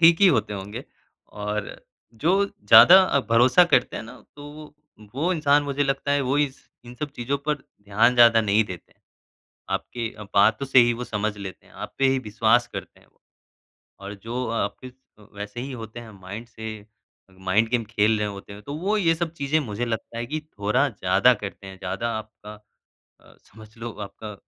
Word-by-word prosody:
ठीक 170 +1 +6
ही 200 - +7
होते 110 - +2
होंगे 105 +5 -7 0.5
और 105 0 -4 0.5
जो 195 +4 +4
ज़्यादा 190 -2 +7
अ, 140 -6 +1
भरोसा 125 +9 +6
करते 135 -8 +1
हैं - - -5
ना, 125 +3 -12 0.2
तो 145 0 -10
वो, 150 0 -12 0.4
वो 165 +7 0
इंसान 145 -3 +3
मुझे 145 0 -1
लगता 140 +1 -1
है 145 - +2
वो 135 +1 0
इस 140 -2 -2 0.2
इन 120 0 -11
सब 145 +3 -5
चीज़ों 135 +4 -2
पर 150 - +3
ध्यान 105 -2 0
ज़्यादा 120 -1 +6
नहीं 105 +1 +2
देते 90 -4 -10
हैं, - - -43 0.7
आपके 115 -2 -3 0.3
बातों 105 +6 +3
से 135 - +4
ही 120 -1 +5
वो 120 +1 -5
समझ 105 -1 -3
लेते 95 -2 -9
हैं, - - -21
आप - - -8
पे 135 - +3
ही 135 0 +2
विश्वास 115 +1 +2
करते - - -8
हैं - - -25
वो। - - -35 0.8
और 100 +1 -7
जो 125 +2 -4
आप 100 -3 -2
इस 130 - -9 0.4
वैसे 105 +3 -7
ही 135 +1 -6
होते 115 -1 -8
हैं 115 -2 -11
माइंड 100 +5 -8
से 110 -1 -7 0.7
माइंड 100 +4 +1
गेम 120 -2 0
खेल 110 -1 +2
रहे 105 - -1
होते 100 0 -9
हैं 105 +1 -11
तो 140 - -7
वो 195 +7 0
ये 170 -6 +2
सब 165 0 -3
चीज़ें 140 0 0
मुझे 120 -3 -4
लगता 115 0 -4
है 120 - -3
कि 155 +5 -3 0.2
थोड़ा 105 +1 +2
ज़्यादा - - +3
करते 95 - -8
हैं। 95 0 -10
ज़्यादा 100 +6 -3
आपका 105 -1 -11 0.7
अ, - - -21
समझ 110 +2 -16
लो 115 +1 -5
आपका 105 +1 -8
120 Hz, 195 wpm, -24 LUFS, 105-140 Hz, 0.8 s, ही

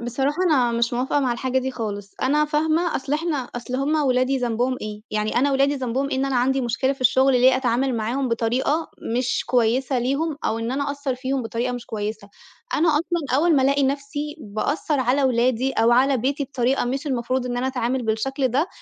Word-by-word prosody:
بصراحة 265 +5 -1
أنا 250 -5 +3
مش 235 +1 0
موافقة 260 +4 0
مع 255 -3 +1
الحاجة 260 +2 -1
دي 260 +1 -2
خالص، 205 -5 -5
أنا 295 +3 +3
فاهمة 315 +3 +1
أصل 270 +1 -5
إحنا 315 0 0 0.2
أصل 245 +1 -4
هُم 285 +4 0
ولادي 255 0 +2
ذنبهم 245 +1 0
ايه؟ 210 0 -6
يعني 215 +1 -1
أنا 280 +3 +3
ولادي 275 +1 +2
ذنبهم 265 +1 -2
إيه - - -1
إن 265 - 0
أنا 270 -2 0
عندي 265 +2 +2
مشكلة 250 +3 0
في 275 - -12
الشغل 260 +2 +4
ليه 255 +1 +5
أتعامل 260 +1 0
معاهم 245 +5 -1
بطريقة 245 +7 0 0.3
مش 250 0 0
كويسة 245 +2 +1
ليهم، 280 +5 -1
أو 225 - 0
إن 230 +2 -3
أنا 280 +1 -1
أأثّر 280 -2 -3
فيهم 260 +1 -2
بطريقة 235 +2 -2
مش 245 -1 -6
كويسة، 210 -1 -5 0.5
أنا 330 +3 +3
أصلًا 300 -3 0
أول 330 +1 +3
ما 265 - +3
ألاقي 280 +1 +2
نفسي 285 +2 -2
بأثّر 280 +6 -1
على 260 +3 +2
ولادي 255 +1 +1
أو 225 0 +3
على 265 +3 +4
بيتي 275 +4 -1
بطريقة 260 -1 0
مش 270 +5 -3
المفروض 255 -1 -1
إن 245 - -3
أنا 250 +1 -1
أتعامل 255 -1 -1
بالشكل 255 +4 -1
ده، 285 +9 0
260 Hz, 200 wpm, -23 LUFS, 240-280 Hz, 0.5 s, ليه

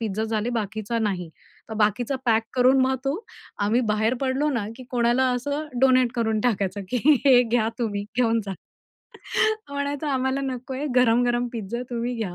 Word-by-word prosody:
Pizza 220 -1 -2
झाले, 220 +1 -1
बाकीचा 220 0 -2
नाही." 190 -6 -2 0.4
तर 220 - -5
बाकीचा 220 +5 +1
पॅक 225 -1 +3
करून 260 +1 +4
मग 260 0 +2
तो 275 +2 0 0.5
आम्ही 230 +4 +2
बाहेर 220 +3 +1
पडलो 270 +3 0
ना, 230 -7 -1
की 255 - -10
कोणाला 245 +1 +2
असं 285 +5 -3
डोनेट 255 -2 +4
करून 220 -3 0
टाकायचं 205 -4 0
की 250 - 0 0.3
"हे 250 -2 +7
घ्या 230 -1 +1
तुम्ही 205 -4 -2
घेऊन 230 -2 +2
जा." 195 - -3 1.2
म्हणायचा, 285 +1 -2
"आम्हाला 265 +1 0
नकोय 265 +1 -4
गरम-गरम 245 0 +3
पिझ्झा 235 +2 -4
तुम्ही 240 +1 -2
घ्या" 195 -6 -4
240 Hz, 160 wpm, -24 LUFS, 220-260 Hz, 1.2 s, हे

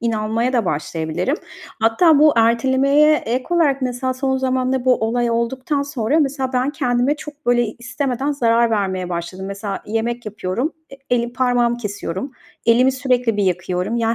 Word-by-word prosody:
inanmaya 230 +1 -1
da 235 -4 +1
başlayabilirim. 160 - -2 0.4
Hatta 285 +8 +4
bu 305 0 +6
ertelemeye 265 +6 +4
ek 250 -1 -2
olarak 300 -6 +2
mesela 255 +1 -2
son 265 0 0
zamanda 260 -1 0
bu 255 -1 +5
olay 235 +2 0
olduktan 255 +5 -1
sonra 280 +1 0
mesela 270 -2 -1
ben 255 +2 +1
kendime 255 -1 0
çok, 295 0 -11
böyle, 240 0 +3
istemeden 255 +4 -3
zarar 235 -3 +2
vermeye 190 -4 -1
başladım. 180 +2 -5
Mesela 200 0 -5
yemek 230 +2 -2
yapıyorum, 215 - -3 0.2
e - - -9 0.2
elim 235 0 -2
parmağımı 245 -2 +1
kesiyorum, 205 +1 -5 0.3
elimi 250 +3 +4
sürekli 250 -4 0
bir 205 - +1
yakıyorum, 180 +3 -1
yani, 230 -1 +1
245 Hz, 155 wpm, -20 LUFS, 225-265 Hz, 0.4 s, bu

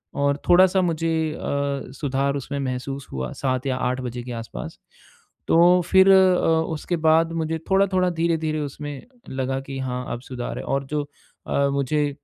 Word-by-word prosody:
और 140 0 +1
थोड़ा-सा 185 +1 +6
मुझे 165 -2 0
अ, 140 -2 -3
सुधार 140 0 0
उसमें 140 +1 -4
महसूस 135 +1 -4
हुआ 65 -2 -4
7 130 0 0
या 130 - 0
8 130 +1 -1
बजे 120 -1 -5
के 125 - -7
आसपास। 115 -1 -7 0.7
तो 175 +2 +5
फिर 190 +1 +5
अ, 190 -1 +5 0.3
उसके 170 +3 -2
बाद 165 +1 +4
मुझे 160 +1 -2
थोड़ा-थोड़ा 190 -2 +3
धीरे-धीरे 160 -2 0
उसमें 145 -1 -6 0.3
लगा 130 0 -2
कि 135 0 -7
हाँ, 125 -1 -3
अब 120 - -6
सुधार 125 -2 -6
है, - - -6
और 135 0 -1
जो 150 +1 -2 0.4
अ, 140 0 +2
मुझे 145 +2 0
140 Hz, 160 wpm, -23 LUFS, 130-165 Hz, 0.7 s, थोड़ा-सा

